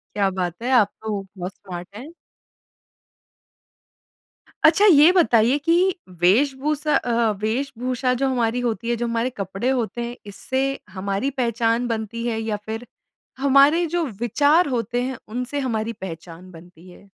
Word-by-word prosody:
क्या 200 -2 +2
बात 180 +1 -4
है 250 - -2
आप 220 -6 +5
तो 215 -2 -2 0.2
बहुत 180 +1 -5
स्मार्ट 180 -2 -9
हैं। 270 +8 -9 2.5
अच्छा 325 +6 +6
ये 315 -3 +7
बताइए 255 -7 +3
कि 330 +4 +1 0.5
वेश-भूसा 280 - +2
अ, 245 - -1 0.3
वेश-भूषा 250 +2 -1
जो 270 - +3
हमारी 245 -1 0
होती 230 -1 -2
है, 240 - +1
जो 240 +1 -2
हमारे 230 +2 -1
कपड़े 195 +1 -4
होते 240 -2 -2
हैं, 240 +1 -6
इससे 260 +6 -3 0.3
हमारी 200 +6 -2
पहचान 235 -2 0
बनती 230 +1 -3
है? 225 -1 -1
या 220 -2 -2
फिर 225 +2 -5 0.5
हमारे 280 +5 +4
जो 340 +1 -1 0.2
विचार 290 - +3
होते 245 -1 -1
हैं 260 0 -4
उनसे 250 +5 -4
हमारी 220 0 -2
पहचान 170 +1 -10
बनती 175 +1 -15
है? 200 - -17
235 Hz, 145 wpm, -22 LUFS, 205-265 Hz, 2.5 s, ये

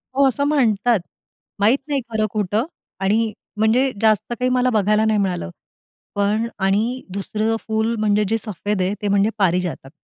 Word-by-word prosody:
हो, 275 0 +5
असं 270 +2 0
म्हणतात. 240 -6 +2 0.6
माहीत 220 +6 +4
नाही 285 -2 0
खरं-खोटं 215 0 0 0.3
आणि 215 +3 +1 0.3
म्हणजे 235 +5 +3
जास्त 215 +1 +2
काही 250 0 +1
मला 255 0 +2
बघायला 215 -1 +2
नाही 215 -1 +2
मिळालं. 180 - -1 0.7
पण 205 +3 +1
आणि 215 +7 +1
दुसरं 215 +3 -1
फुल 220 +1 0
म्हणजे 210 0 +2
जे 225 - +2
सफेद 210 -2 -3
आहे, 185 +2 0
ते 205 - -1
म्हणजे 200 +1 +3
पारीजातक. 180 -6 0
215 Hz, 150 wpm, -21 LUFS, 200-230 Hz, 0.7 s, हो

